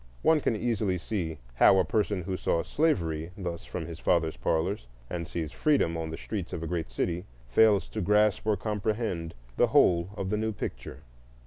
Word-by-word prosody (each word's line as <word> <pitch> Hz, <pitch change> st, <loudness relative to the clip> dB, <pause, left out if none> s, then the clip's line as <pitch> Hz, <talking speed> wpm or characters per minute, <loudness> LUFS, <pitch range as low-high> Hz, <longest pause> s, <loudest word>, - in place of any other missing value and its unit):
One 160 Hz, -2 st, +4 dB
can 115 Hz, -, +1 dB
easily 110 Hz, -4 st, 0 dB
see 85 Hz, -4 st, -3 dB, 0.2 s
how 80 Hz, +9 st, +6 dB
a 95 Hz, -, +3 dB
person 100 Hz, 0 st, 0 dB
who 95 Hz, +2 st, -3 dB
saw 85 Hz, -2 st, 0 dB
slavery 85 Hz, -, 0 dB
thus 85 Hz, -4 st, -5 dB
from 85 Hz, -, -5 dB
his 85 Hz, 0 st, -8 dB
father's 80 Hz, -2 st, +1 dB
parlors, 80 Hz, -, -1 dB, 0.2 s
and 85 Hz, -2 st, -3 dB
sees 80 Hz, -4 st, -4 dB
freedom 140 Hz, -, +2 dB
on 80 Hz, -1 st, -3 dB
the 80 Hz, -, -5 dB
streets 100 Hz, -5 st, -5 dB
of 85 Hz, -, -4 dB
a -, -, -3 dB
great 85 Hz, -4 st, -2 dB
city, 85 Hz, +9 st, -2 dB, 0.2 s
fails 105 Hz, -, +4 dB
to 110 Hz, -, -3 dB
grasp 105 Hz, +2 st, +3 dB
or 105 Hz, -2 st, +3 dB
comprehend 105 Hz, -5 st, -2 dB, 0.2 s
the -, -, +5 dB
whole 85 Hz, 0 st, +4 dB
of 95 Hz, 0 st, -3 dB
the 105 Hz, -, +1 dB
new 110 Hz, 0 st, -1 dB
picture. -, -, -6 dB
90 Hz, 190 wpm, -28 LUFS, 85-105 Hz, 0.2 s, how